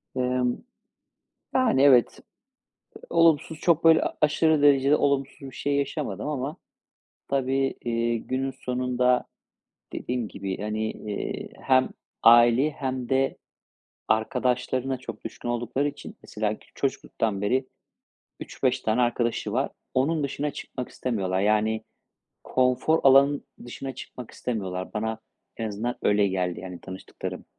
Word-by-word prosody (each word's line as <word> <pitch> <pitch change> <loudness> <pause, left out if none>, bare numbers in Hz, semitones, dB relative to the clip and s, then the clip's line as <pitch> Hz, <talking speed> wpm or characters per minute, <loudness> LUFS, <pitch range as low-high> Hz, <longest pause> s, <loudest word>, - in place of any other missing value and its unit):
Emm, 125 -1 0 1.0
yani, 250 - +3
evet. 130 -4 +5 0.8
Eee, - - -12
olumsuz, 165 -1 +3
çok, 170 -2 +2
böyle, 165 -1 +7
a - - -3
aşırı 155 0 +3
derecede 140 0 +5
olumsuz 140 -2 0
bir 135 -1 -9
şey 145 0 -1
yaşamadım 140 -7 -2
ama 150 +1 -3 0.7
tabii, 135 0 0
iii, 115 -1 0
günün 135 +1 -1
sonunda 125 0 0 0.7
dediğim 125 -3 -3
gibi, 95 -2 -5
hani, 110 +1 -2
eee, 105 -1 -5
hem 130 -1 +3 0.3
aileye 120 +5 +6
hem 130 -3 -4
de 135 0 +1 0.7
arkadaşlarına 125 +3 0
çok 130 - -9
düşkün 120 - -6
oldukları 120 +4 -1
için, - - -11
mesela 105 0 -2
kü - - -22
çocukluktan 110 -6 -2
beri 130 +6 +1 0.7
3-5 - - -1
tane 110 +3 +1
arkadaşı 120 -3 0
var. 130 +5 0 0.2
Onun 150 +4 +1
dışına 145 +2 -2
çıkmak 125 -2 -7
istemiyorlar. 95 -7 -2
Yani, 110 +2 +1 0.6
konfor 130 +5 +2
alanın 140 +1 +5 0.2
dışına 130 +2 -6
çıkmak 125 -1 -9
istemiyorlar. 95 -6 -4
Bana 110 +1 -2 0.4
en 110 -1 -2
azından 110 +4 -3
öyle 105 -1 +3
geldi, 90 -2 -2
yani, 90 -1 -8
tanıştıklarım. 95 0 -7
125 Hz, 125 wpm, -26 LUFS, 110-135 Hz, 1.0 s, böyle